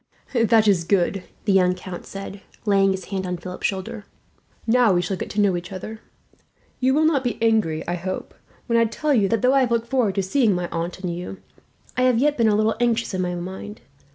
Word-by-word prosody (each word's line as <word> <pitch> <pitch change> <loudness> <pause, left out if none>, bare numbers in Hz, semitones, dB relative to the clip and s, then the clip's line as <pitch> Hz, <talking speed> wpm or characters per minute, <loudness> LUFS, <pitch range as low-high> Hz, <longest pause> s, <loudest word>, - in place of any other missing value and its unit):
"That 225 -2 +4
is 190 -4 +3
good," 185 +1 +1 0.2
the 200 - +3
young 180 -1 +4
count 180 -1 -8
said, 195 0 -8 0.2
laying 195 -2 +4
his 190 -1 -2
hand 190 -1 -2
on 180 0 -2
Philip's 180 +1 -3
shoulder; 195 +1 -5 0.6
"now 235 -3 +4
we 175 - +3
shall 195 - -2
get - - -5
to 210 - -3
know 200 -3 +3
each 175 +1 -6
other. 215 +4 -7 0.8
You 265 +1 +2
will 310 +1 +3
not 295 -4 +2
be 245 -4 -2
angry, 220 -9 +1
I 175 - -1
hope, 185 +2 -5 0.3
when 230 -1 +2
I 230 - +4
tell 290 +7 -1
you 205 -6 +3
that, 230 0 0
though 255 +1 +4
I 275 - +5
have 250 - +1
looked 235 0 0
forward 240 -7 +1
to 195 - +1
seeing 210 +1 +2
my 175 0 -2
aunt 170 +2 -4
and 175 -3 -3
you, 180 +2 -6 0.6
I 255 - 0
have 255 -2 +4
yet 290 +4 +2
been 230 -4 +3
a 210 - +3
little 215 +1 +2
anxious 230 -2 +1
in 185 - -1
my 180 -1 -2
mind. 190 +4 -7
200 Hz, 230 wpm, -23 LUFS, 185-230 Hz, 0.8 s, I